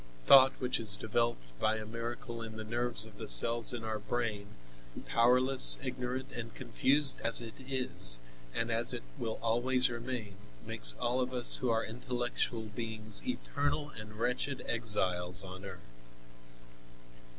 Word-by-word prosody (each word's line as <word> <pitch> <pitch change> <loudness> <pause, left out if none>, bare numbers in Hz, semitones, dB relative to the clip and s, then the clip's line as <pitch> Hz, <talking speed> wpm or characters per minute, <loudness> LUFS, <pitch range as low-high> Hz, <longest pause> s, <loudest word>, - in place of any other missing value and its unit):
Thought, 135 -1 +7
which 125 -1 -2
is 105 -3 +4
developed 115 - -2
by 110 0 +1
a 110 0 -6
miracle 115 +2 -7
in 110 -1 -8
the 110 - -6
nerves 115 -1 -2
of 110 -2 -16
the - - -7
cells 115 - +6
in 120 -2 -6
our 110 -1 -4
brain, 105 -2 -4 0.6
powerless, 125 +3 +3
ignorant 130 0 -5
and 115 -2 -8
confused 135 +4 +2
as 115 0 +2
it 115 -2 -5
is, 130 - +3 0.3
and - - -3
as - - +2
it - - -7 0.2
will 110 -1 -4
always 125 +2 +1
remain, 120 -4 -6 0.3
makes - - +4
all 125 +2 -1
of 130 0 -4
us 125 -1 +5
who 125 - -3
are 115 0 0
intellectual 120 0 -3
beings 110 -1 -4
eternal 145 - -3
and 110 -3 -10
wretched 125 +4 -2
exiles 95 -5 +1
on 95 0 -10
earth. 95 -2 -9
115 Hz, 150 wpm, -31 LUFS, 110-125 Hz, 0.6 s, Thought